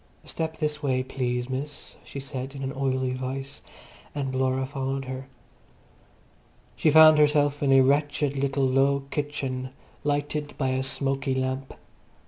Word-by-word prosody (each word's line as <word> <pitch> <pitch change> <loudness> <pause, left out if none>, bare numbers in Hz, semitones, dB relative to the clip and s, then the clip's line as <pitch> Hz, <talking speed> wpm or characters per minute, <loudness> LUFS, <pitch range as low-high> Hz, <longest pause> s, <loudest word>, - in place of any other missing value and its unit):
"Step 160 0 -3
this 150 -1 -2
way, 130 -3 +1
please, 125 -2 -2
miss," 135 +3 -6
she 140 - -7
said 135 0 -6
in 135 - -5
an 135 0 -3
oily 130 -1 0
voice, 130 +1 -5 0.5
and 135 -2 -2
Laura 130 0 +1
followed 135 0 -3
her. 130 +1 -6 1.5
She 155 - +3
found 155 0 +8
herself 145 -1 +3
in 140 -2 +2
a 135 0 +7
wretched 145 +1 +2
little 135 0 +1
low 135 +2 +3
kitchen, 135 -3 -3 0.3
lighted 145 0 -2
by 135 -2 0
a 130 0 0
smoky 135 0 -1
lamp. 130 +1 -2
135 Hz, 140 wpm, -26 LUFS, 130-145 Hz, 1.5 s, found